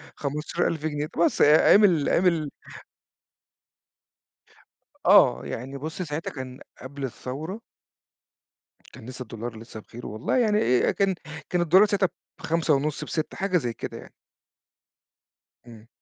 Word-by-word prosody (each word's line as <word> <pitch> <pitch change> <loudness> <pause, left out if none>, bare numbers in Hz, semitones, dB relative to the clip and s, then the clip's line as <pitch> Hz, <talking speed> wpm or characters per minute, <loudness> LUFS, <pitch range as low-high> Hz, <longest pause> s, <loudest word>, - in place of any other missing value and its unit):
15.000 155 +2 -2
جنيه، 150 -1 -2
طبعًا 170 - +1
بس - - -2
آآ، 150 +2 +6
أيام 210 - +7
ال 165 -8 +3
أيام 185 - +2
ال 160 -4 +1 2.6
آه، - - +5
يعني 135 +4 -6
بُصّ 160 +6 -6
ساعتها 160 -1 -4
كان 130 -2 -8 0.2
قبل 135 +1 -8
الثورة. 155 - -6 1.3
كان - - -12
لسه 130 0 -9
الدولار 115 0 -7
لسه 110 -1 -10
بخيره 120 +3 -10
والله 110 - -2
يعني 215 -4 +3 0.3
آآ، - - +2
أ - - +3
كان 195 -2 +1 0.3
كان 180 -1 +1
الدولار 185 +5 +6
ساعتها 195 -3 +1 0.3
ب5.5 155 -3 0
ب6، 155 -2 -4
حاجة 190 -1 +1
زي 120 -7 -2
كده - - -7
يعني. - - -13 1.6
إمم. 115 -1 -14
150 Hz, 135 wpm, -25 LUFS, 130-175 Hz, 2.6 s, أيام